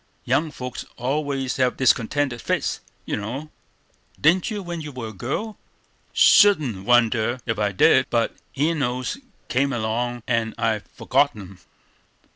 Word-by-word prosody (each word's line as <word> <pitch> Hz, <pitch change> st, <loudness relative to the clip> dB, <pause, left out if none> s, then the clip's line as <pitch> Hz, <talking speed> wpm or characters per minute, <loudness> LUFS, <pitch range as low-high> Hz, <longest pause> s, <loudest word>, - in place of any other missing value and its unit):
Young 155 Hz, +2 st, +1 dB
folks 125 Hz, -3 st, -6 dB
always 135 Hz, 0 st, -2 dB
have 130 Hz, -2 st, +1 dB
discontented 130 Hz, 0 st, +1 dB
fits, -, -, -1 dB, 0.3 s
you -, -, -2 dB
know. 130 Hz, +9 st, -5 dB, 0.7 s
Didn't 170 Hz, +7 st, +3 dB
you 210 Hz, -3 st, -4 dB
when 175 Hz, -2 st, -5 dB
you 150 Hz, -1 st, -7 dB
were 125 Hz, -4 st, -6 dB
a -, -, -10 dB
girl?" 140 Hz, -, -4 dB, 0.5 s
"Shouldn't 140 Hz, -, +5 dB
wonder 120 Hz, 0 st, +3 dB
ef 115 Hz, -3 st, -2 dB
I 105 Hz, -1 st, +1 dB
did; 95 Hz, -, +4 dB
but -, -, 0 dB, 0.2 s
Enos 140 Hz, -, -1 dB, 0.3 s
came 140 Hz, +2 st, +1 dB
along, 120 Hz, +1 st, -2 dB
and 115 Hz, -2 st, 0 dB
I 110 Hz, -2 st, +1 dB
forgot -, -, 0 dB
'em." 95 Hz, -3 st, -11 dB
125 Hz, 135 wpm, -23 LUFS, 115-145 Hz, 0.7 s, Shouldn't